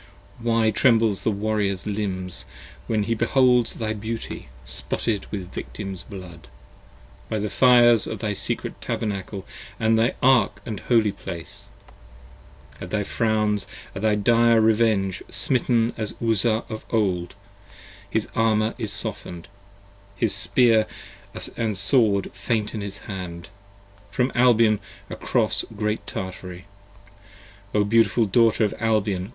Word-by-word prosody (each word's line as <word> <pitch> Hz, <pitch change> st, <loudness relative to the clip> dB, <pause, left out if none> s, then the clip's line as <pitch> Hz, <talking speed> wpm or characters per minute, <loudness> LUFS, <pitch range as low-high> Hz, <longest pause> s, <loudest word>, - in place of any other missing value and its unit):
Why 115 Hz, -1 st, +2 dB
trembles 115 Hz, -3 st, +3 dB
the -, -, +1 dB
Warriors 105 Hz, -3 st, -1 dB
limbs 95 Hz, -4 st, -3 dB, 0.4 s
when 110 Hz, -2 st, +1 dB
he 115 Hz, +3 st, 0 dB
beholds 125 Hz, +1 st, +3 dB
thy 110 Hz, -1 st, -2 dB
beauty 110 Hz, -, -6 dB, 0.2 s
Spotted 95 Hz, -, -3 dB
with 95 Hz, -3 st, -6 dB
Victims' 95 Hz, -3 st, -6 dB
blood: 90 Hz, -, -11 dB, 0.8 s
by 110 Hz, -, -1 dB
the 105 Hz, 0 st, -2 dB
fires 120 Hz, -3 st, +5 dB
of -, -, -4 dB
thy 105 Hz, -2 st, -2 dB
secret -, -, -4 dB
tabernacle 100 Hz, -2 st, -3 dB, 0.3 s
50 -, -, -24 dB
And 110 Hz, 0 st, +4 dB
thy 115 Hz, +3 st, +2 dB
ark 125 Hz, -5 st, +4 dB
& 100 Hz, -, -6 dB
holy 115 Hz, -4 st, +4 dB
place: 85 Hz, -4 st, -8 dB, 1.2 s
at -, -, -6 dB
thy -, -, 0 dB
frowns, 105 Hz, -3 st, 0 dB, 0.3 s
at 95 Hz, -, -6 dB
thy 110 Hz, -1 st, +3 dB
dire 115 Hz, +2 st, +4 dB
revenge: 110 Hz, -4 st, +2 dB
Smitten 120 Hz, -2 st, +1 dB
as 110 Hz, -2 st, -4 dB
Uzzah 115 Hz, 0 st, +1 dB
of 110 Hz, -1 st, -6 dB
old, 95 Hz, -6 st, 0 dB, 0.7 s
his 110 Hz, +1 st, -1 dB
armour 110 Hz, -1 st, +2 dB
is 110 Hz, -4 st, -3 dB
soften'd: 100 Hz, -5 st, -6 dB, 0.7 s
his 110 Hz, -1 st, 0 dB
spear 110 Hz, +3 st, +3 dB, 0.7 s
And 110 Hz, -4 st, -1 dB
sword 100 Hz, -2 st, +2 dB
faint 105 Hz, +2 st, -1 dB
in 110 Hz, -, -4 dB
his 100 Hz, 0 st, -6 dB
hand, 90 Hz, -3 st, -7 dB, 0.6 s
from 125 Hz, +5 st, 0 dB
Albion 115 Hz, -4 st, +4 dB, 0.3 s
across -, -, +1 dB
Great 105 Hz, +1 st, -2 dB
Tartary. 90 Hz, -1 st, -6 dB, 1.1 s
O 105 Hz, -, +4 dB
beautiful 115 Hz, +1 st, +3 dB
Daughter 115 Hz, +1 st, +3 dB
of 105 Hz, -, -2 dB
Albion! 105 Hz, -4 st, 0 dB
110 Hz, 125 wpm, -24 LUFS, 100-115 Hz, 1.2 s, fires